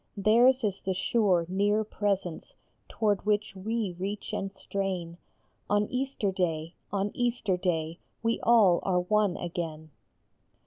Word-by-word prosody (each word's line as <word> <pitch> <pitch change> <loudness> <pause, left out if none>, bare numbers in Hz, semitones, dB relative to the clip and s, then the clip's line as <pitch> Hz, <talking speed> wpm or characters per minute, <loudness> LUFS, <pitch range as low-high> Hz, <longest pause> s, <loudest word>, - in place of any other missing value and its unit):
Theirs 240 +6 +4
is 200 -2 -1
the 190 -1 -1
sure, 185 -3 +2
near 205 +4 +1
Presence 195 -5 -3 0.3
toward 210 -3 0
which 210 -1 0
we 210 -1 -2
reach 200 +2 -4
and 195 0 -2
strain; 185 -4 -3 0.5
On 205 0 +3
Easter 255 -6 -1
day, 165 -3 -2 0.2
on 200 0 -1
Easter 240 -5 0
day, 170 -2 -2 0.2
we 230 0 +1
all 215 -7 +5
are 180 -2 +1
one 205 0 +1
again. 165 -3 -5
195 Hz, 130 wpm, -28 LUFS, 180-215 Hz, 0.5 s, all